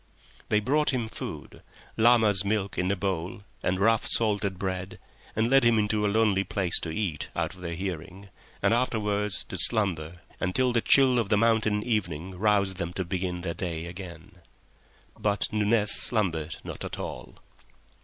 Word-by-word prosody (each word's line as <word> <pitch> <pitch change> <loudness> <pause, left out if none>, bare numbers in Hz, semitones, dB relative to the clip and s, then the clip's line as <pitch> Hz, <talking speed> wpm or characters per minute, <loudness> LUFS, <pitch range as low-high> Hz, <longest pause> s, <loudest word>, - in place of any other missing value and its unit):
They 105 - +3
brought 145 +8 +1
him 125 -4 -1
food, - - -7 0.3
llama's 110 -4 +5
milk 100 -1 -1
in 90 0 0
a - - +1
bowl 95 +2 -3 0.2
and 90 +1 0
rough 110 +2 +3
salted 105 -4 +1
bread, 95 0 -4 0.4
and 110 +1 +2
led 135 +1 +5
him 120 -1 +4
into 105 0 +1
a 105 - +2
lonely 105 -2 +2
place 95 -3 +2
to 85 - -5
eat 80 -3 -3
out - - -1
of 90 - -14
their 85 -1 -4
hearing, 95 +2 -6 0.3
and - - +4
afterwards 105 -4 0
to 90 - -6
slumber 90 -7 0 0.2
until 125 +7 +1
the 115 - +2
chill 130 -1 +5
of 110 -4 -1
the 105 - +3
mountain 110 -2 +2
evening 95 -7 -2
roused 100 -3 +2
them 85 -1 -4
to 95 -1 -3
begin 90 0 -3
their 85 -1 -3
day 85 -3 -4
again. 90 +1 -10 0.8
But 105 -1 +1
Nunez 105 -1 +2
slumbered 85 -8 0
not - - -7
at - - -5
all. - - -7
100 Hz, 165 wpm, -27 LUFS, 90-110 Hz, 0.8 s, llama's